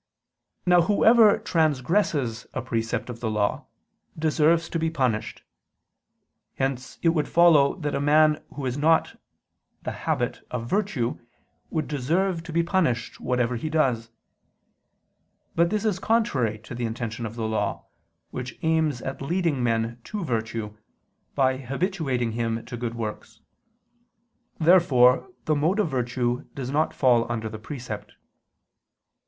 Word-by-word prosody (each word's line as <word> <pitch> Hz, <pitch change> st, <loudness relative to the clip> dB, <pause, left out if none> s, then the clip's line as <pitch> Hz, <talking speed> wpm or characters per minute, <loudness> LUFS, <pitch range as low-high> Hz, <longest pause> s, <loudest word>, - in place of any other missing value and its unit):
Now 180 Hz, -1 st, +5 dB
whoever 215 Hz, +4 st, +5 dB
transgresses 155 Hz, -, 0 dB
a 130 Hz, -, -1 dB
precept 115 Hz, -2 st, -2 dB
of 120 Hz, -, -9 dB
the 115 Hz, -, -2 dB
law, 105 Hz, -1 st, -1 dB, 0.5 s
deserves 160 Hz, +1 st, +2 dB
to 165 Hz, -, -2 dB
be 160 Hz, 0 st, +1 dB
punished. 130 Hz, -9 st, -1 dB, 1.1 s
Hence 130 Hz, -1 st, -3 dB
it 165 Hz, -, +5 dB
would 155 Hz, -3 st, +1 dB
follow 165 Hz, -5 st, +5 dB
that 150 Hz, -5 st, -3 dB
a 140 Hz, -, -1 dB
man 150 Hz, +1 st, +4 dB
who 140 Hz, -, -4 dB
has 130 Hz, +2 st, -2 dB
not 160 Hz, +2 st, +2 dB, 0.6 s
the -, -, -3 dB
habit -, -, -2 dB
of 120 Hz, -2 st, -4 dB
virtue, 165 Hz, -, -1 dB, 0.5 s
would 155 Hz, -2 st, -2 dB
deserve 165 Hz, +6 st, 0 dB
to -, -, -7 dB
be 170 Hz, +1 st, +2 dB
punished, 165 Hz, -10 st, 0 dB
whatever 125 Hz, -1 st, 0 dB
he 155 Hz, +7 st, -4 dB
does. 130 Hz, -8 st, +1 dB, 1.4 s
But 170 Hz, +1 st, +3 dB
this 215 Hz, +1 st, -1 dB
is 200 Hz, -4 st, +1 dB
contrary 140 Hz, -, +1 dB
to -, -, -9 dB
the 120 Hz, 0 st, -3 dB
intention 115 Hz, 0 st, -4 dB
of 110 Hz, -, -9 dB
the 115 Hz, -2 st, -2 dB
law, 110 Hz, 0 st, -2 dB, 0.5 s
which 125 Hz, -1 st, -6 dB
aims 160 Hz, -5 st, +1 dB
at 135 Hz, -, -5 dB
leading 165 Hz, -2 st, 0 dB
man 115 Hz, 0 st, -1 dB
to 210 Hz, -3 st, -4 dB
virtue, 110 Hz, -4 st, -3 dB, 0.6 s
by 130 Hz, -2 st, +2 dB
habituating 135 Hz, -, -2 dB
him 115 Hz, 0 st, -2 dB
to 125 Hz, -, -7 dB
good 120 Hz, -1 st, -4 dB
works. 110 Hz, -2 st, -6 dB, 1.2 s
Therefore 155 Hz, -, +5 dB, 0.2 s
the 155 Hz, -, +2 dB
mode 160 Hz, +7 st, +1 dB
of 205 Hz, -, +2 dB
virtue 125 Hz, -1 st, -1 dB
does 130 Hz, -2 st, -4 dB
not 155 Hz, +2 st, +1 dB
fall 120 Hz, -3 st, +2 dB
under 110 Hz, -1 st, -3 dB
the 110 Hz, 0 st, -8 dB
precept. 110 Hz, -4 st, -7 dB
135 Hz, 140 wpm, -25 LUFS, 120-165 Hz, 1.4 s, Now